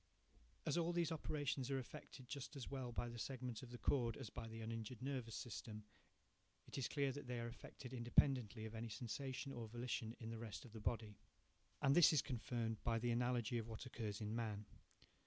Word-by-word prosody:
As 175 - +3
all 170 +1 +2
these 170 -2 +3
operations 145 -4 0
are 135 - +2
effected 130 0 -6
just 140 +2 -4
as 135 -4 -4
well 130 -3 -2
by 120 +1 0
the 120 0 -5
segment 125 -1 -2
of 130 - -7
the 120 - -6
cord 120 -4 +3
as 120 -7 -5
by 115 +1 -4
the 115 0 -6
uninjured 115 +1 -3
nervous 130 -3 -2
system, 110 -2 -4 0.8
it - - -7
is 135 -3 +1
clear 140 -2 +2
that 140 0 -5
they 125 -1 -1
are 115 - -1
effected 125 +2 -8
independently 120 -2 +4
of 110 - -5
any 115 +1 -3
sensation 130 +4 -2
or 120 -3 -3
volition 120 0 -1
in 115 -1 -4
the 115 - -4
rest 110 -1 -5
of 120 - -10
the 110 - -6
body. 110 -2 0 0.6
And 140 0 +7
this 175 - +10
is 150 - +5
confirmed 120 -4 -1
by 115 -1 +3
the 120 +1 +2
analogy 120 -1 +3
of 115 - -3
what 115 +2 -5
occurs 110 -5 -2
in 105 0 -1
man. 110 -3 -1
120 Hz, 205 wpm, -44 LUFS, 115-130 Hz, 0.8 s, this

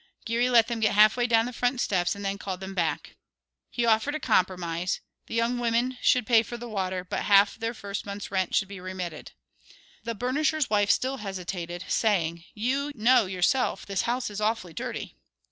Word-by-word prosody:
Geary 235 +2 +1
let 235 -3 +6
them 235 -1 -3
get 215 -2 +2
half 215 +1 +6
way 245 -1 +1
down 225 -1 +3
the 250 - -5
front 245 +1 0
steps 180 -4 +1
and 200 0 -7
then 195 0 -2
called 190 -3 -5
them 190 0 -7
back. 170 -4 -2 0.5
He 240 - -1
offered 230 +6 +2
a - - -2
compromise, 180 - 0 0.3
the - - -5
young 235 +1 +1
women 240 +2 0
should 250 -2 +3
pay 230 -1 +5
for 235 +2 -7
the 240 0 -8
water, 185 -4 -2
but 180 - -4
half 200 0 +5
of - - -18
their 230 +1 -3
first 200 -1 -5
month's 200 0 -7
rent 190 -2 0
should 195 - +2
be 200 -1 -9
remitted. 180 -3 -6 0.7
The 230 0 -4
burnisher's 280 +4 0
wife 205 -1 +2
still 265 +1 +1
hesitated, 180 -4 -5
saying, 170 -6 0
"You 265 +7 -1
know 230 -2 +4
yourself 190 +8 0
this 195 -1 -1
house 245 -1 -2
is 205 +1 -5
awfully 210 -6 -1
dirty." - - -6
215 Hz, 195 wpm, -27 LUFS, 185-240 Hz, 0.7 s, let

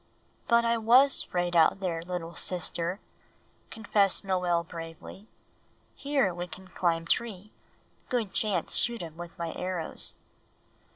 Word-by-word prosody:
"But 235 0 +4
I 230 0 +2
was 255 +5 +6
'fraid 175 -1 -2
out 170 +4 +5
there, 175 -4 -2
little 170 -1 -5
sister," 175 +1 -1 0.7
confessed 205 -4 +1
Noel 180 -3 +1
bravely. 165 +5 -10 0.7
"Here 275 -10 0
we 175 +1 -5
can 185 +1 -11
climb 170 -2 0
tree; 210 +1 -2 0.6
good 230 -6 -1
chance 200 -6 0
shoot 235 -5 0
um 160 -2 -9
with 175 0 -9
my 170 -1 -3
arrows." 180 -3 -4
180 Hz, 125 wpm, -28 LUFS, 170-215 Hz, 0.7 s, was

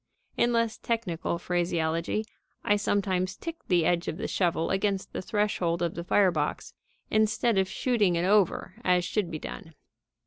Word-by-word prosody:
In 240 - +2
less 230 -1 0
technical 185 -8 -2
phraseology, 170 +2 -1 0.4
I 205 - +3
sometimes 190 -2 0
tick 330 0 -6
the 175 -3 +3
edge 175 0 +1
of 160 - -3
the - - -3
shovel 170 -3 0
against 195 0 -1
the - - -3
threshold 185 -4 0
of 170 - -1
the 170 - -5
fire 190 +1 +4
box, 150 -3 -3 0.4
instead 215 0 +2
of 190 0 +1
shooting 215 -8 +1
it 170 +1 0
over 200 -2 +1
as 180 -1 +3
should 195 -1 -1
be 160 - -4
done. 165 +1 -8
185 Hz, 165 wpm, -28 LUFS, 170-210 Hz, 0.4 s, fire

